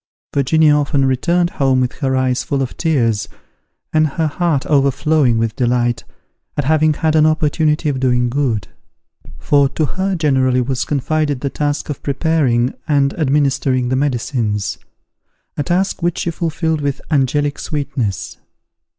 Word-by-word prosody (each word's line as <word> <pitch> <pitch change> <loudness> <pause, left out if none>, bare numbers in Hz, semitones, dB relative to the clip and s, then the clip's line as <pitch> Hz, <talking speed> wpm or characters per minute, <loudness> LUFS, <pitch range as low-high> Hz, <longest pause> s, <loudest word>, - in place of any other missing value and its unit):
Virginia 150 +2 +3
often 140 -1 +1
returned 170 +7 +1
home 135 -2 +1
with 125 0 0
her 135 -3 0
eyes 130 -1 0
full 140 -2 -1
of 125 - -6
tears, 120 -10 0 0.6
and 155 0 +3
her 160 +3 -2
heart 155 -2 0
overflowing 140 -2 +2
with 115 -1 -1
delight, 120 -1 0 0.5
at 145 - +1
having 155 +2 +3
had 160 0 0
an 155 0 +5
opportunity 155 0 +1
of 140 -3 -1
doing 125 -1 +2
good; 120 -8 -1 0.7
for 140 - +2
to 155 - -1
her 190 +5 -2
generally 130 -6 +2
was 125 0 -1
confided 145 -1 -1
the 140 - -2
task 145 +1 -2
of 145 - -5
preparing 140 -5 +1
and 140 -3 +2
administering 135 -3 +1
the 130 - +1
medicines, 120 -7 -1 0.8
a - - -2
task 180 +5 -1
which 175 0 0
she 170 - -1
fulfilled 160 -1 -2
with 140 -1 -2
angelic 145 +1 +1
sweetness. 135 - -3
140 Hz, 145 wpm, -17 LUFS, 130-155 Hz, 0.8 s, an